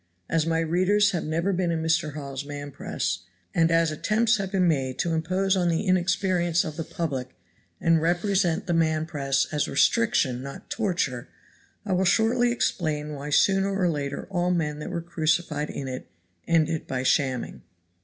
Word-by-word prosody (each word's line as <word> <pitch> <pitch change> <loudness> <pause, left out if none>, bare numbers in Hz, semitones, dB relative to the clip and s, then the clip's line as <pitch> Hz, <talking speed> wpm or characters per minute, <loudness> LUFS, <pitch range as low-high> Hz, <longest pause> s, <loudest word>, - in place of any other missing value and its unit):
As 165 -1 0
my 165 0 +1
readers 185 +5 +3
have 175 -4 -2
never 165 +5 0
been 180 -1 0
in 165 -1 -1
Mr. 160 -2 0
Hawes's 140 -2 -5
man 145 0 -7
press, 90 -7 -3 0.3
and 165 -1 +3
as 165 -1 +3
attempts 220 +9 +2
have 195 -2 -4
been 185 -3 +2
made 135 -5 0
to 170 - 0
impose 185 +4 +1
on 180 -2 +1
the 165 +5 0
inexperience 185 -2 +2
of 155 - -5
the 165 - -3
public 135 -7 -4 0.4
and 165 -1 +3
represent 175 +1 +1
the 175 - -1
man 160 -1 +1
press 140 -3 0
as 150 - +1
restriction 155 - +2
not 140 +1 -9
torture, 175 - -1 0.6
I 200 - -1
will 185 +1 +2
shortly 240 +6 +3
explain 155 -10 -1
why 145 +1 -6
sooner 195 +6 +3
or 180 - +3
later 145 -3 -3
all 175 -1 0
the 180 - +2
men 150 -2 -2
that 150 - -5
were 175 -2 -3
crucified 160 -2 0
in 135 - -5
it 130 0 -6 0.4
ended 165 -1 +1
by 130 -1 -2
shamming. 130 -2 0
165 Hz, 175 wpm, -26 LUFS, 150-185 Hz, 0.6 s, readers